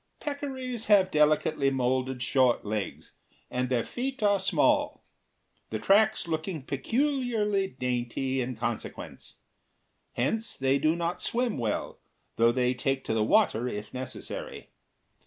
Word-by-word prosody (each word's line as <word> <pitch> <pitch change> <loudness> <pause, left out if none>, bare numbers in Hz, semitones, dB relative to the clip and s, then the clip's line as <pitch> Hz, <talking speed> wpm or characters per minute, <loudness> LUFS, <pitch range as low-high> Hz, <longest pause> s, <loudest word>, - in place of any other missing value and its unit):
Peccaries 260 -5 -4
have 195 -3 +5
delicately 150 -1 +3
moulded 130 -1 0
short 125 0 +2
legs, 105 -1 -4 0.4
and 125 0 -1
their 120 -3 +1
feet 260 -1 -4
are 205 -1 +4
small, 190 - +2 0.7
the - - -2
tracks 215 0 +3
looking 160 -1 -3
peculiarly 225 - 0
dainty 125 0 -2
in 125 0 -3
consequence. - - -5 0.8
Hence, 220 - -1
they 135 +1 +2
do 155 +3 +2
not 170 0 -2
swim 245 -1 0
well, 110 -3 -2 0.4
though 115 +1 +5
they 125 0 +1
take 135 +1 -1
to - - -2
the 110 -1 +2
water 110 +2 +3
if 105 -3 -6
necessary. 130 0 -6
140 Hz, 125 wpm, -28 LUFS, 125-210 Hz, 0.8 s, have